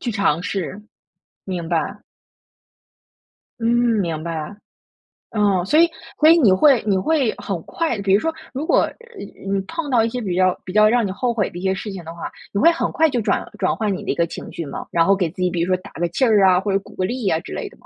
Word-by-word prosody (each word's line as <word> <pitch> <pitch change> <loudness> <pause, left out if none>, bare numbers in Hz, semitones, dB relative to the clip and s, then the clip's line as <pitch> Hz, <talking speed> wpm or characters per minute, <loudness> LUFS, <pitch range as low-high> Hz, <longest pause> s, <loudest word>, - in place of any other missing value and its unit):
去 240 - -2
尝 200 -6 +1
试， 190 +2 -4 0.6
明 180 -3 -4
白。 180 +4 -1 1.6
嗯， 230 - -1 0.3
明 165 -4 -2
白。 165 +1 -5 0.8
哦， 200 -4 +2
所 300 +10 +3
以 335 0 +6 0.3
所 310 - +6
以 335 - +7
你 225 -11 +5
会 255 +6 +5
你 195 -2 +2
会 265 +3 +1
很 185 -5 -4
快 320 -9 -2
比 195 -1 +2
如 200 - +5
说， 325 +7 -1 0.2
如 275 +4 -3
果， - - +4
呃 - - 0 0.6
嗯 195 - 0
你 195 - 0
碰 320 - -5
到 240 -4 +3
一 230 - 0
些 250 - -4
比 185 -5 -2
较 185 -1 +2
比 185 - -7
较 215 0 +6
让 240 0 +2
你 190 - -4
后 245 +4 -1
悔 215 -4 0
的 - - -10
一 175 - -6
些 190 0 +1
事 210 - -5
情 190 -3 -7
的 165 +1 -8
话， 170 - -6 0.2
你 200 - 0
会 330 - +6
很 335 - -2
快 320 -1 +3
就 245 -3 -1
转 205 -2 0
转 - - +1
换 215 -3 -1
你 - - -7
的 - - -1
一 - - -2
个 170 - +2
情 - - -8
绪 165 - -5
吗？ 140 - -6
然 165 -1 +3
后 195 - +4
给 180 -4 0
自 185 +3 -8
己， 180 - +2
比 170 -1 -2
如 185 +2 +1
说 185 - -1
打 200 - -12
个 175 +1 -2
气 260 +10 +1
儿 210 -4 +4
啊， 185 -1 +5
或 200 +1 -2
者 195 - +2
鼓 200 - -16
个 185 - -1
励 240 0 -2
啊 160 - +1
之 - - -9
类 75 - -4
的 - - -20
吗？ - - -24
195 Hz, 280 characters per minute, -21 LUFS, 180-235 Hz, 1.6 s, 以